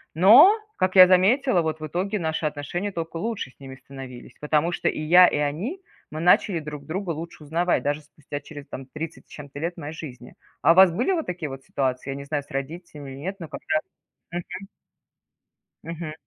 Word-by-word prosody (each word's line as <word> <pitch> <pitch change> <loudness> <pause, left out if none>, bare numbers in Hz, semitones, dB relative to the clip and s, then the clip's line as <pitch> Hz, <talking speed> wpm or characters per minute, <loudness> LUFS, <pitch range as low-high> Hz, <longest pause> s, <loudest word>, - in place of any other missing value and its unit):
Но 245 - +8 0.2
как 185 0 0
я 185 -1 +10
заметила 195 +5 +4
вот 160 -1 -3
в 155 - -5
итоге 190 +7 -2
наши 160 -1 -2
отношения 155 +7 -3
тока 165 -2 -5
лучше 210 - -4
с - - -35
ними 135 -1 -10
становились. 130 -2 -11
Потому 150 +3 +1
что - - 0
и - - -4
я 175 +4 +7
и - - 0
они- 170 - -2 0.3
мы 155 - -5
начали 180 +1 +4
друг 150 -2 -8
друга 185 +3 -4
лучше 165 0 -7
узнавать, 170 +4 0
даже 145 +1 -1
спустя 145 -1 -8
через 145 -1 -11
там 135 - -8
30 155 +3 -7
с - - -35
чет-то 145 -1 -10
лет 170 +3 -3
моей 155 -1 -6
жизни. 130 -6 -10 0.3
А 145 - +6
у - - +4
вас 190 -1 +8
были 235 - 0
вот 330 -4 -1
такие 175 -4 -4
вот 135 0 -9
ситуации, 130 -1 -2
я - - -4
не 140 - -7
знаю 145 0 -2
с - - -21
родителями 145 0 -6
или 135 - -9
нет, 190 +7 -4
но 165 - -7
когда 155 - -1 0.5
Мгм. 175 +1 -3 1.4
Мгм. 165 -1 -6
160 Hz, 205 wpm, -24 LUFS, 145-180 Hz, 1.4 s, я